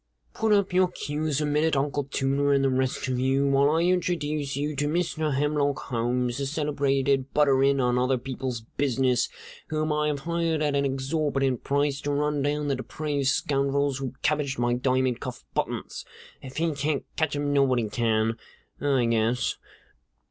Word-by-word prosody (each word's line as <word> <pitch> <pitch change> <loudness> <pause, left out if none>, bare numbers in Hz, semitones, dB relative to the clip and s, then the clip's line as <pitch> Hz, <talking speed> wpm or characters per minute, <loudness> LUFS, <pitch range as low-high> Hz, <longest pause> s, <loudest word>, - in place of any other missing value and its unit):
"Put 220 -1 0
up 200 -3 +3
your 185 0 +4
cues 150 -3 -2
a - - +1
minute, 150 +1 +1
Uncle 140 0 0
Tooter 140 +1 +1
and 140 0 +3
the 135 - +2
rest 130 0 -1
of 130 -1 -1
you, 135 +2 +2
while 140 +1 +4
I 160 +2 +2
introduce 165 -6 0
you 150 +1 -2
to 145 +1 0
Mr. 155 -2 0
Hemlock 145 0 +1
Holmes, 120 +1 -1
the 140 - -1
celebrated 140 -2 0
butter 140 -3 +4
in 140 0 +3
on 125 -1 +2
other 130 +1 +2
people's 130 -1 -4 0.2
business, 130 -3 +1 0.4
whom 155 0 -1
I 150 0 +1
have 145 -2 -2
hired 165 0 0
at 145 -1 +1
an 140 0 +2
exorbitant 135 -1 -1
price 140 0 0
to 145 - -2
run 150 0 0
down 145 +1 0
the 140 - +1
depraved 145 +1 -3
scoundrels 140 0 +1
who 130 -1 -5
cabbaged 145 -2 0
my 120 0 +1
diamond 130 0 +1
cuff - - -7
buttons. - - -3 0.4
If 135 0 -10
he 165 0 +1
can't 145 0 -1
catch 160 -2 0
'em, 145 0 -1
nobody 130 -5 +2
can, 110 0 0 0.4
I 135 -4 +2
guess. 115 +1 +1
140 Hz, 170 wpm, -26 LUFS, 130-150 Hz, 0.4 s, your